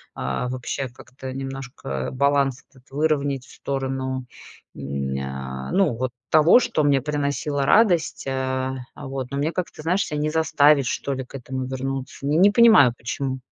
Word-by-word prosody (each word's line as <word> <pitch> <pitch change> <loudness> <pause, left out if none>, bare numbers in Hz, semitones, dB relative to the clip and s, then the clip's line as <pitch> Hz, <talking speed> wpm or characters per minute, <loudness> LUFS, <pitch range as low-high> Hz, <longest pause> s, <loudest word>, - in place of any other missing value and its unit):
а, 65 - -2
вообще, 130 +1 -3
как-то 130 +2 -10
немножко, 135 - -7 0.2
э, - - -10
баланс 140 0 +1
этот 130 -2 -22
выровнять 140 -2 0
в - - -16
сторону, 130 -1 -3 0.5
м, 70 -1 -3
ня, 65 -1 -5
ну 190 -10 +3
вот 130 +2 -2 0.2
того, 160 +9 +6
что 155 - 0
мне 140 -2 +3
приносило 145 0 -1
радость, 190 -6 +3
э. - - -1 0.6
А 145 - -8
вот, 135 -1 -4
но 140 - -2
мне 150 +3 0
как-то, 175 -3 -5
знаешь, 185 +6 +1
ся 150 - -5
не 150 +1 0
заставить, 150 -4 +4
что 140 - -2
ли, 130 0 -4
к 125 - -13
этому 130 0 -4
вернуться. 135 +1 -5
Не, 150 +3 +2
не 195 +3 +7
понимаю, 210 - +7
почему. 130 +2 -3
135 Hz, 170 wpm, -23 LUFS, 130-150 Hz, 0.6 s, не